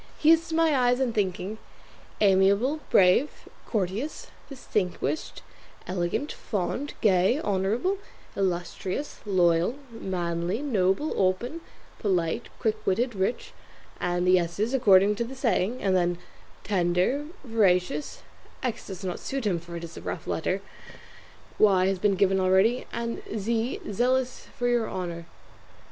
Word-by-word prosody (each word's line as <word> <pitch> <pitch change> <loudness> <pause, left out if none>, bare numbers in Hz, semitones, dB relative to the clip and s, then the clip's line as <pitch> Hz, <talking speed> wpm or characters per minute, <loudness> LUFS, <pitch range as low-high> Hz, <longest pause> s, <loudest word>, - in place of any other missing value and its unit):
He 315 - +5
is 330 0 +4
to 320 - -2
my 325 -2 +3
eyes 250 -1 +3
and 255 -3 0
thinking, 200 +1 -2 0.6
Amiable, 200 +8 +4
Brave, 190 +10 +3 0.2
Courteous, 215 +7 -3 0.2
Distinguished, 215 - -3 0.4
Elegant, 180 - -2
Fond, 235 +8 -3
Gay, 195 +5 +3
Honourable, 215 - 0 0.4
Illustrious, 185 +7 -2
Loyal, 175 +2 +3 0.2
Manly, 175 -2 -2
Noble, 210 +1 +1
Open, 235 - 0 0.4
Polite, 185 +1 0
Quickwitted, 225 +2 0
Rich, 195 +4 -2 0.5
and 175 0 0
the 185 0 +5
S's 200 +8 -2
according 200 -5 +5
to 235 - 0
the 250 +3 -7
saying, 245 -2 0
and 190 -2 +2
then 175 -1 +1 0.5
Tender, 185 +9 +1 0.2
Veracious: 180 - +1 0.4
X 240 -3 -3
does 190 0 -7
not 180 -2 -3
suit 270 -3 -4
him, 180 -5 +1
for 170 +1 -10
it 170 - -6
is 170 0 -9
a - - -7
rough 165 - -5
letter; 185 +4 -1 1.0
Y 190 -3 +5
has 190 -1 0
been 200 0 +2
given 190 0 +3
already; 190 +6 +3
and 235 0 -3 0.2
Z 230 +4 -1
Zealous 250 +4 0
for 245 - 0
your 240 -2 +1
honour." 170 -2 -5
200 Hz, 130 wpm, -27 LUFS, 180-245 Hz, 1.0 s, He